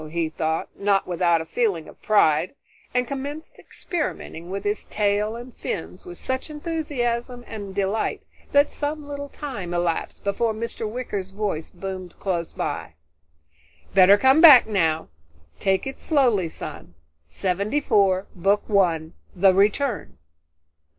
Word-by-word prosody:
he 165 0 -1
thought, 160 +1 -2
not 200 -1 +1
without 170 -2 +2
a - - -6
feeling 185 -6 -1
of - - -15
pride, 185 - +3 0.4
and 250 0 0
commenced 285 +4 -6
experimenting 290 - -5
with 195 +1 -4
his 205 +1 -1
tail 210 +1 0
and 240 +1 -9
fins - - -5
with 360 - -8
such 260 +3 -3
enthusiasm 265 -6 -3
and 200 -3 -7
delight 200 +2 -1 0.3
that 285 +1 +4
some 295 0 -4
little 285 0 -6
time 200 -15 -5
elapsed 175 -1 -2
before 215 +3 0
Mr. 225 -1 -4
Wicker's 210 -5 -4
voice 195 -5 -3
boomed 185 -1 -7
close 175 -4 -2
by. 80 - -4 1.0
"Better 195 +1 +7
come 265 +7 +5
back 295 -8 +10
now. 165 -7 0 0.5
Take 190 -1 +1
it 270 0 -6
slowly, 240 - +2
son. 85 - -8 0.3
Seventy 195 - -1
four, 195 -7 +2
Book 195 +3 +1
One: 170 -6 +2 0.2
The 190 +1 +5
Return." 210 +6 +1
205 Hz, 135 wpm, -24 LUFS, 180-255 Hz, 1.0 s, back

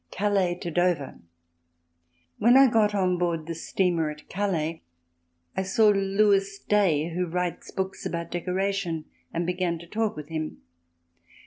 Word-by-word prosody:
Calais 195 -3 +1
to 175 -1 -6
Dover 175 -4 0 1.2
When 240 +4 +6
I 275 - +8
got 210 -2 +3
on 180 -2 +1
board 170 -3 -1
the 165 - -4
steamer 165 -1 0
at 150 0 -10
Calais 170 -5 -1 0.7
I - - 0
saw 205 +3 +4
Lewis 195 0 +2
Day, 175 -8 +2
who 180 +1 -1
writes 180 +1 -3
books 190 0 -4
about 170 0 -4
decoration, 180 -2 -1 0.3
and 170 +1 -2
began 180 -1 -1
to 170 - -11
talk 215 +4 -1
with 150 0 -8
him. 155 -1 -4
180 Hz, 140 wpm, -26 LUFS, 165-195 Hz, 1.2 s, I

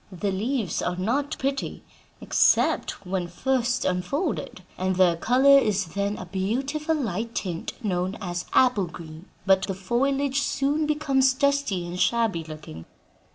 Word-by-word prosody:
The 195 +2 -2
leaves 220 +2 -1
are 180 - -1
not 245 +10 -1
pretty 270 +1 -3 0.4
except 200 - +2
when 180 -1 -2
first 245 +6 0
unfolded, 230 - -2
and 185 0 -1
their 180 -2 +4
color 265 +9 +5
is 200 - -1
then 200 +1 -1
a 185 - -7
beautiful 265 - -1
light 230 - -3
tint 175 -4 -3
known 185 +1 -1
as 175 -3 -4
apple 245 -8 +4
green. 160 +1 -11 0.2
But 190 -1 +4
the 195 - -3
foliage 270 +8 0
soon 285 +3 0
becomes 275 -4 +2
dusty 280 - +1
and 175 +1 -6
shabby 225 -8 +1
looking. 155 - -10
210 Hz, 140 wpm, -25 LUFS, 180-270 Hz, 0.4 s, color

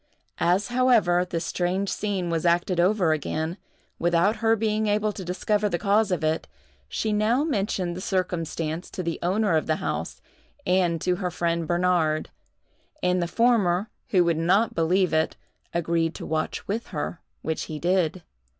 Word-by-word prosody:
As, 185 +5 +2
however, 240 -8 +3
this 165 -2 -2
strange 185 +3 -1
scene 190 -4 -2
was 165 -1 0
acted 175 +1 +2
over 180 -2 +3
again, 160 +3 -3 0.4
without 175 +5 +2
her 225 0 +3
being 215 0 0
able 210 +1 +1
to 200 - -7
discover 205 +4 0
the 175 - 0
cause 205 +3 +2
of 180 -3 -1
it, 155 +1 0 0.4
she 215 -1 -1
now 220 +6 +2
mentioned 195 - -1
the 185 - -6
circumstance 170 -3 -2
to 185 - -5
the 170 -1 -3
owner 195 0 +1
of 155 - 0
the 155 - +2
house - - -4 0.5
and 180 -2 +2
to 180 -1 +1
her 180 -1 -2
friend 170 -1 -1
Bernard; 175 -3 +1 0.7
and 180 0 +2
the 170 - 0
former, 210 -3 +2 0.2
who 185 -3 +4
would 170 -2 +1
not 195 +7 +3
believe 175 +1 +2
it, 160 0 +1 0.4
agreed 165 -1 0
to - - -7
watch 155 0 -2
with 220 +4 -2
her, 165 0 -4 0.2
which 160 0 -2
he 155 - -6
did. 175 0 0
180 Hz, 165 wpm, -25 LUFS, 170-205 Hz, 0.7 s, who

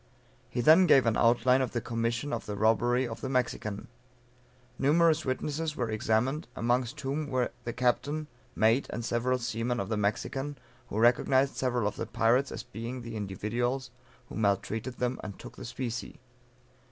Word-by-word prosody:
He 120 - -1
then 165 +8 +7
gave 135 -6 +6
an 115 -1 +2
outline 125 +2 +4
of 130 - -2
the 120 - 0
commission 115 +4 -2
of - - -4
the 105 - -3
robbery 120 +4 +2
of 115 - -7
the 130 - -3
Mexican. 115 -4 -2 0.9
Numerous 155 +2 +3
witnesses 150 +4 -2
were 120 -3 -2
examined, 110 +7 0
amongst 120 +1 0
whom 145 +3 -2
were 130 -3 0
the 120 - -2
captain, 145 +5 0 0.3
mate, 115 +5 +3
and 115 - -4
several 125 +2 +1
seamen 120 0 -2
of 100 - -3
the 110 - 0
Mexican, 135 +7 -2 0.3
who - - -4
recognized 130 +4 +3
several 125 -4 0
of - - -4
the - - -3
pirates 125 +4 +2
as 110 - -5
being 120 +1 -6
the 115 -1 -7
individuals 120 +6 -2 0.4
who - - -11
maltreated 110 +3 -1
them, 125 +1 -1
and 100 -3 -7
took - - -11
the - - -8
specie. 120 -1 -5
120 Hz, 165 wpm, -29 LUFS, 115-130 Hz, 0.9 s, then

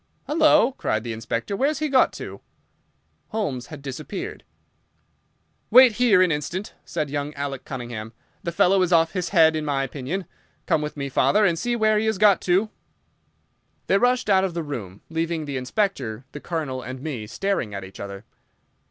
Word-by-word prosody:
"Halloa!" 305 -5 +4
cried 110 - -1
the 120 -1 -4
Inspector, 115 - -3
"where's 280 +7 +1
he 305 0 -1
got 265 -3 +4
to?" - - -8 0.9
Holmes 140 - -3
had 145 -3 -10
disappeared. 145 +8 -6 1.3
"Wait 255 +2 +8
here 215 -5 +4
an 180 - +2
instant," 170 +7 -3
said 155 -4 -3
young 145 +1 -3
Alec 140 -2 -4
Cunningham. 120 -4 -6 0.3
"The 170 - -3
fellow 185 +3 +4
is 180 -1 +1
off 165 -1 +4
his 180 -3 -2
head, 160 -4 +5
in 155 - -2
my 140 -2 0
opinion. 145 +8 -4 0.4
Come 155 - +2
with 150 0 -5
me, 140 -1 -3
father, 205 +9 +3
and 170 -4 +2
see 240 +3 0
where 215 -2 +3
he 220 - 0
has 220 -2 +1
got 205 -1 +5
to!" 190 +4 +1 1.1
They 195 - +3
rushed 245 0 +2
out 190 -2 +4
of 185 -3 -2
the 170 - -2
room, 105 -10 -6
leaving 165 -1 -1
the 140 -2 -3
Inspector, 130 - -2
the 145 - -7
Colonel, 150 -6 -3
and 130 +1 -7
me 130 -7 -5
staring 130 - -2
at 100 - -5
each 95 +1 -11
other. 100 +1 -7
160 Hz, 180 wpm, -24 LUFS, 130-200 Hz, 1.3 s, Wait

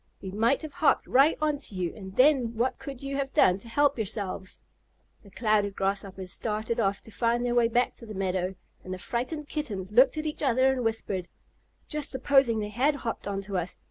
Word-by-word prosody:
We 190 - -7
might 230 +9 +1
have 310 -2 -7
hopped 310 - +2
right 275 +5 +4
on 300 -2 0
to 215 - -5
you, 180 -2 -2
and 190 -2 -9
then 255 -4 +4
what 240 +3 0
could 275 -2 -8
you 275 0 -3
have 275 -1 -3
done 185 -11 +5
to 230 - -10
help 285 +1 +2
yourselves?" 195 -3 -3 0.6
The 200 - -16
Clouded 210 -2 +1
Grasshoppers 195 -1 -3
started 220 +1 -2
off 195 -2 0
to 225 - -13
find 235 +2 0
their 240 - 0
way 240 -1 +4
back 240 +2 +1
to 230 - -10
the 215 - -7
meadow, 185 -1 -1 0.3
and 185 0 -5
the - - -8
frightened 270 - -3
Kittens 210 - -4
looked 255 +7 +5
at 310 - -2
each 305 - -4
other 260 -1 +3
and 255 -2 -2
whispered: 205 -5 -2 0.6
"Just 300 -2 0
supposing 265 -3 +3
they 210 -1 -2
had 265 +7 +2
hopped 235 -6 -4
on 200 -1 -2
to 195 -1 -2
us! 175 +1 -5
230 Hz, 210 wpm, -28 LUFS, 195-270 Hz, 0.6 s, done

